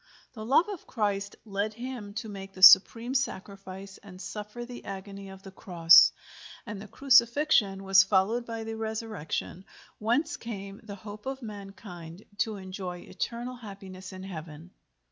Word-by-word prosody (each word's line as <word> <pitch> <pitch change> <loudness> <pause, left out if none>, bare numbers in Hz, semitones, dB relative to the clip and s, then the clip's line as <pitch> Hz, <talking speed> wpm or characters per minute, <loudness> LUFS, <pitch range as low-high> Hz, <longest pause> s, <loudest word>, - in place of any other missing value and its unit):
The 220 -3 -8
love 275 - +4
of 405 -6 -7
Christ 200 -3 -2
led 210 +1 -2
him 235 -4 -7
to 225 0 -4
make 195 -2 -8
the 185 - -7
supreme 230 +6 +8
sacrifice 195 -5 -4
and 190 -3 -13
suffer 210 +5 -7
the 245 0 -9
agony 195 0 -7
of 190 0 -12
the 195 - -10
Cross, 170 -3 +6 0.5
and 210 -3 -6
the 215 - -9
Crucifixion 235 -4 +3
was 195 0 +7
followed 195 +5 +2
by 225 -1 -4
the 225 0 -5
Resurrection, 220 -5 -4 0.4
whence 240 +9 0
came 200 -3 -7
the 205 -2 -8
hope 210 +3 -10
of 270 -1 -4
mankind 195 -4 -9 0.2
to 215 +2 0
enjoy 185 -2 -6
eternal 240 +6 -5
happiness 195 -4 -10
in 185 0 -9
heaven. 165 -2 -9
200 Hz, 150 wpm, -28 LUFS, 190-230 Hz, 0.5 s, supreme